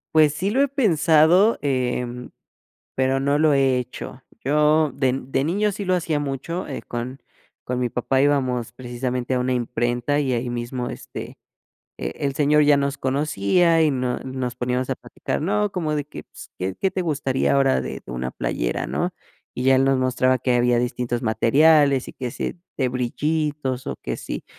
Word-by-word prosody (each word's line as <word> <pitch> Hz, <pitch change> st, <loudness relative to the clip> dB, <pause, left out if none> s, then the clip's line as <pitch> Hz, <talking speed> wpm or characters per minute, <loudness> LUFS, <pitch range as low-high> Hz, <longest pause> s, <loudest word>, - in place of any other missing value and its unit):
Pues 155 Hz, -2 st, +6 dB
sí, 190 Hz, +6 st, -1 dB
lo 265 Hz, +5 st, +2 dB
he 280 Hz, -, +4 dB
pensado, 180 Hz, -, +4 dB
em, 125 Hz, -2 st, -2 dB, 0.6 s
pero 130 Hz, +1 st, +1 dB
no 140 Hz, +1 st, +1 dB
lo 155 Hz, 0 st, +4 dB
he 135 Hz, -2 st, +3 dB
hecho. 125 Hz, +1 st, -7 dB, 0.2 s
Yo 150 Hz, +2 st, +3 dB
de 130 Hz, -2 st, +1 dB
de 135 Hz, +1 st, -1 dB
niño 205 Hz, +5 st, +1 dB
sí 200 Hz, -, -5 dB
lo 185 Hz, 0 st, +2 dB
hacía 165 Hz, -4 st, 0 dB
mucho, 145 Hz, +6 st, -4 dB
eh, 140 Hz, -, -6 dB
con 120 Hz, +3 st, -5 dB, 0.4 s
con 125 Hz, 0 st, -2 dB
mi 125 Hz, -1 st, 0 dB
papá 130 Hz, +3 st, 0 dB
íbamos 130 Hz, -5 st, +1 dB
precisamente 125 Hz, 0 st, -3 dB
a -, -, +1 dB
una 125 Hz, +1 st, 0 dB
imprenta 120 Hz, +3 st, 0 dB
y 135 Hz, -3 st, 0 dB
ahí 120 Hz, +1 st, -1 dB
mismo, 120 Hz, +1 st, -3 dB
este, -, -, -8 dB, 0.6 s
e -, -, -3 dB
el 140 Hz, -1 st, -1 dB
señor 150 Hz, +1 st, +4 dB
ya 145 Hz, 0 st, +5 dB
nos 140 Hz, 0 st, -1 dB
conocía 150 Hz, -, +2 dB
y 155 Hz, -, +4 dB
nos 125 Hz, -2 st, -2 dB
nos 130 Hz, -2 st, -4 dB
poníamos 125 Hz, +1 st, -2 dB
a 135 Hz, -, +1 dB
platicar, -, -, -5 dB
no, 205 Hz, +5 st, 0 dB
como 155 Hz, -4 st, -1 dB
de 145 Hz, -, -1 dB
que 150 Hz, -, -9 dB
s -, -, -11 dB
qué 95 Hz, +1 st, -2 dB
qué 195 Hz, -, +2 dB
te 185 Hz, -, -3 dB
gustaría 140 Hz, -6 st, 0 dB
ahora 135 Hz, -1 st, +3 dB
de -, -, -5 dB
de -, -, -8 dB
una 65 Hz, 0 st, -3 dB
playera, -, -, -2 dB
¿no? -, -, -2 dB, 0.4 s
Y 125 Hz, -, -3 dB
ya 135 Hz, 0 st, +5 dB
él 130 Hz, +1 st, +4 dB
nos 135 Hz, -1 st, +2 dB
mostraba 130 Hz, 0 st, +2 dB
que 125 Hz, +1 st, 0 dB
había 120 Hz, 0 st, +3 dB
distintos 120 Hz, 0 st, -2 dB
materiales, 140 Hz, +5 st, +4 dB
y -, -, -9 dB
que 125 Hz, -2 st, -5 dB
sí -, -, -4 dB, 0.2 s
de 130 Hz, -3 st, +1 dB
brillitos, 135 Hz, +1 st, -2 dB
o, -, -, -4 dB
que -, -, -4 dB
si -, -, -6 dB
135 Hz, 190 wpm, -23 LUFS, 125-150 Hz, 0.6 s, Pues